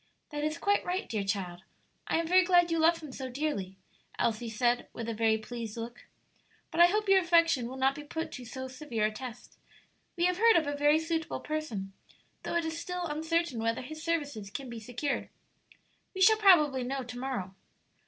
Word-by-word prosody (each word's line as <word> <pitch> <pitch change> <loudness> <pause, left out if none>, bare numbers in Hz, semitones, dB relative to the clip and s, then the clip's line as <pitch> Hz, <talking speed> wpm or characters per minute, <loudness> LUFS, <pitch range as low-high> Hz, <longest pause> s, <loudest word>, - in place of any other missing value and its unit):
"That 295 0 -3
is 305 +1 -1
quite 405 +3 +2
right, 360 +1 -2
dear 215 -3 -2
child; 190 -3 -3 0.5
I - - +1
am 335 - 0
very 365 +3 +5
glad 350 -2 +4
you 330 - +1
love 330 +1 +3
him 300 - -7
so 260 0 -6
dearly," 245 -9 -3 0.4
Elsie 230 +1 0
said, 240 +2 +1
with 230 - -5
a 230 - -2
very 220 0 +2
pleased 230 0 -7
look; 235 +1 -7 0.6
"but - - -3
I 345 - +10
hope 425 +3 0
your 390 0 +6
affection 335 -8 +3
will 260 +2 -7
not 265 +1 +3
be 295 - -8
put 320 +2 -5
to 255 - -7
so 260 +2 -6
severe 255 -5 -2
a 215 - +1
test; 245 +2 -9 0.6
we 345 - +2
have 360 0 +1
heard 460 0 +6
of 325 - +4
a 290 0 -2
very 295 +1 +4
suitable 320 0 -2
person, 235 -11 -4 0.5
though - - -4
it 340 -1 +1
is 320 0 -3
still 360 0 -4
uncertain 320 -3 -1
whether 230 +2 -1
his 310 +4 -8
services 290 -11 -2
can 250 +5 -6
be 235 - -6
secured. 245 +6 -3 0.9
We 375 - -3
shall 440 +3 +7
probably 305 -10 +5
know 265 +2 -3
to 245 0 -8
morrow." 245 -8 -3
285 Hz, 205 wpm, -30 LUFS, 235-330 Hz, 0.9 s, I